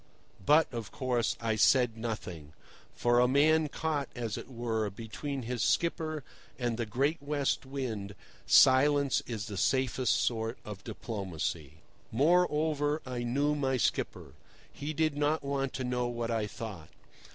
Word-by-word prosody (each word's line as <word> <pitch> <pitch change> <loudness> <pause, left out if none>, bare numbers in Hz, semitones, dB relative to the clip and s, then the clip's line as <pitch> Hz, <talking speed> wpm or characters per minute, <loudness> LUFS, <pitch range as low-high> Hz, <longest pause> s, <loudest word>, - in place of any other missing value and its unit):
But, 150 - +5
of 115 -3 -5
course, 125 -3 0
I 115 -1 0
said 120 +2 +4
nothing. 90 -10 -6 0.4
For 120 0 +3
a 125 - +5
man 155 +4 +4
caught, 150 -2 -2
as 115 -3 -3
it - - -8
were, 115 -4 -2
between 120 +6 -5
his 120 0 -3
skipper 155 - 0 0.3
and 120 -2 -1
the 115 -1 -3
great 140 +9 0
West 140 -2 -1
Wind 110 -8 -4 0.3
silence 140 +1 +5
is 110 -4 -4
the 105 -4 -6
safest 130 -2 +2
sort 115 0 -1
of 105 -2 -8
diplomacy. 85 - -5 0.3
Moreover, 150 +1 +2
I 125 -2 -4
knew 140 +5 +1
my 135 -3 0
skipper. - - -1 0.4
He 145 +2 -4
did 155 -1 0
not 150 +2 +1
want 140 -1 -1
to 135 - -3
know 125 -1 -1
what 120 -1 -3
I 110 -2 0
thought. 105 -8 -8
125 Hz, 145 wpm, -31 LUFS, 110-145 Hz, 0.4 s, But